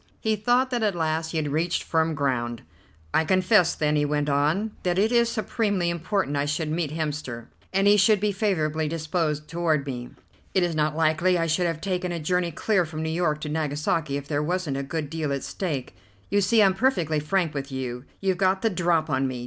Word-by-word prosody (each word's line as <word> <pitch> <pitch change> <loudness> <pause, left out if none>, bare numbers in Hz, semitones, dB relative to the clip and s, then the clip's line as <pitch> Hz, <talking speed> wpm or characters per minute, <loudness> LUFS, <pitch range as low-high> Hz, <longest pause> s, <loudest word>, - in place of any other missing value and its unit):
He 220 -1 +1
thought 245 +5 +2
that 245 -2 0
at 210 -4 +1
last 160 -1 -1
he 165 - -3
had 150 -2 -1
reached 165 +4 0
firm 160 -1 +1
ground. 120 -5 -1 0.5
"I 160 - +4
confess, 185 +1 +3
then," 150 0 +1
he 145 - +2
went 145 0 0
on, 155 +10 +1
"that 180 -1 0
it 215 +4 +3
is 235 -1 +3
supremely 205 -6 0
important 170 -2 -1
I 140 0 +1
should 150 +1 -2
meet 160 -1 -1
Hemster, 150 -7 -4 0.3
and 195 +1 +2
he 205 +1 +6
should 205 +1 +5
be 210 +1 +1
favourably 160 -7 0
disposed 155 -1 -2
toward 160 -3 0
me. 125 -3 -5 0.5
It 190 - +4
is 175 -1 0
not 155 0 0
likely 165 +3 +3
I 165 - +1
should 165 +2 +1
have 165 -1 -3
taken 180 -2 -2
a 170 - -3
journey 175 +2 0
clear 190 +4 +1
from 160 -1 -5
New 160 - -2
York 160 -3 0
to 150 - -4
Nagasaki 150 -1 -1
if 140 0 -7
there 145 -1 0
wasn't 165 -3 -1
a - - -1
good 150 +2 -3
deal 155 -1 -3
at 140 -1 -2
stake. 150 -9 -4 0.4
You 205 0 +3
see, 215 +3 +4
I'm 190 -1 +4
perfectly 180 - +1
frank 165 +2 0
with 140 -1 -5
you. 130 -1 -4 0.2
You've 190 -2 +1
got 190 0 +2
the 225 - +2
drop 170 -3 +1
on 135 -3 0
me. 130 -1 -4
160 Hz, 215 wpm, -25 LUFS, 150-185 Hz, 0.5 s, he